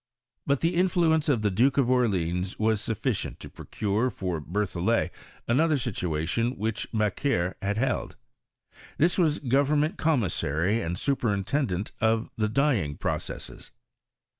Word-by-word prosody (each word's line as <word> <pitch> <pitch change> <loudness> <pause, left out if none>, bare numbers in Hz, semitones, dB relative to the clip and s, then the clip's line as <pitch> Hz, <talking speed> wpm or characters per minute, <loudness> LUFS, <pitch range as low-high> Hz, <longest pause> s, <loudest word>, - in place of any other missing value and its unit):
But 140 -1 +2
the 165 +2 +2
influence 170 -3 +2
of 120 -7 +2
the 105 - +2
Duke 125 +9 +2
of 135 -4 +3
Orleans 95 -7 +1
was 110 -1 +1
sufficient 115 +1 -2
to - - -9
procure 105 +4 -1
for 90 -7 -3
Berthollet 100 +5 0 0.4
another 150 +5 +3
situation 115 - -1
which 110 +2 -3
Macquer 105 -3 0
had 100 +1 -1
held. 130 +1 -1 0.8
This 170 +4 +2
was 155 -3 +3
government 145 +6 +1
commissary 105 - +1
and 85 +2 -3
superintendent 110 -3 -1
of 110 0 +1
the 110 -1 0
dyeing 110 - +1
pro - - -1
cesses. - - -8
115 Hz, 130 wpm, -27 LUFS, 100-140 Hz, 0.8 s, of